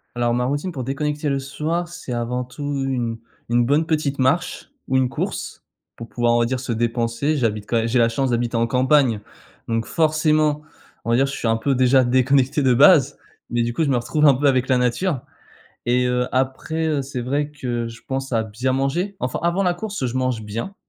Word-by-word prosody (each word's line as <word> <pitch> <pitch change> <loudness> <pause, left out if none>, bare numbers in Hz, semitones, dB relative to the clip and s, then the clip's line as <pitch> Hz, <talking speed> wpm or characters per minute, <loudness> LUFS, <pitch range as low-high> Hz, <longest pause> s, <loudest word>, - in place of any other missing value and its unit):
Alors 120 0 +1
ma 125 0 0
routine 145 +7 -2
pour 130 -5 -5
déconnecter 150 +3 -2
le 140 -1 0
soir, 155 +6 -3
c'est 155 -7 -7
avant 120 +1 -2
tout 125 +3 -12 0.2
une 120 -4 -2 0.3
une 120 0 +3
bonne 150 +5 +2
petite 150 -4 -1
marche 150 +8 0 0.2
ou 130 - 0
une 130 -1 +3
course - - -4 0.3
pour 115 - -9
pouvoir, 120 0 +1
on - - +3
va 120 - +3
dire, 130 +1 -2
se 130 -1 -4
dépenser, 115 +5 0
j'habite 110 -6 -1
quand 115 - 0
et 115 +1 +1
j'ai 125 +2 +1
la 115 -1 +4
chance 135 +3 -1
d'habiter 120 0 -1
en 115 0 +2
campagne, 130 -2 +2 0.5
donc 115 -1 -1
forcément 155 -2 +2 0.4
on - - -5
va 115 - +3
dire 135 +3 +3
je 135 - -4
suis - - -3
un 115 0 +2
peu 135 +4 0
déjà 130 +1 +4
déconnecté 130 +3 +2
de 130 -2 +3
base, 145 +1 +6 0.3
mais 120 0 0
du 120 0 -2
coup, 165 - 0
je 145 - 0
me 130 - +2
retrouve 150 +6 +1
un 140 - +6
peu 140 +3 -2
avec 130 -2 +3
la 130 - +4
nature 125 +6 0 0.7
et 125 +1 +2
heu, 125 0 0
après, 135 +5 -1
heu, 150 -3 0
c'est 130 -2 -5
vrai 145 +4 -1
que 120 -5 -3
je 115 +1 -11
pense 135 0 -4
à 115 -1 +2
bien 110 +4 -2
manger. 165 +10 -1
Enfin 125 0 -2
avant 170 +3 +1
la 180 -2 +1
course 205 -7 -4
je 120 +2 -3
mange 130 -3 0
bien, 115 - -5
130 Hz, 220 wpm, -21 LUFS, 120-145 Hz, 0.7 s, base